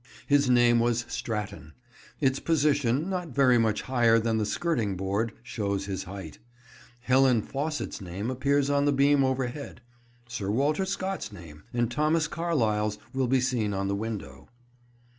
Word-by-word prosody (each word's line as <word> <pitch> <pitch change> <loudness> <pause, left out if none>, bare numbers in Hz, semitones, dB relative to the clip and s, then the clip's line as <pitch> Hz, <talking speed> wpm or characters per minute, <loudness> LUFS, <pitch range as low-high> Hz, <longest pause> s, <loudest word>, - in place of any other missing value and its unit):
His 140 -2 +3
name 120 -1 +5
was 120 0 +1
Stratton. 105 -7 -5 0.5
Its 135 -2 +1
position, 145 -2 +1
not 180 -8 -4
very 130 -3 +5
much 110 -2 +1
higher 120 -3 +3
than 115 -1 +1
the 105 - 0
skirting 115 - -1
board, 100 +4 -1
shows 100 -5 -2
his 95 -1 -4
height. 95 -5 -8 0.6
Helen 125 -2 +3
Faucit's 150 -3 -4
name 95 +6 -4
appears 140 +2 +1
on 140 0 +2
the 145 - +3
beam 140 0 +4
overhead. 130 +1 -2 0.5
Sir 110 -5 -4
Walter 145 - +1
Scott's 190 0 -3
name, 75 -3 -12
and 120 -1 0
Thomas 155 +2 +1
Carlyle's 110 -12 0 0.2
will 130 -1 0
be 130 +2 +3
seen 120 -5 0
on 95 0 -1
the 100 - 0
window." 100 -11 -6
120 Hz, 150 wpm, -27 LUFS, 105-140 Hz, 0.6 s, name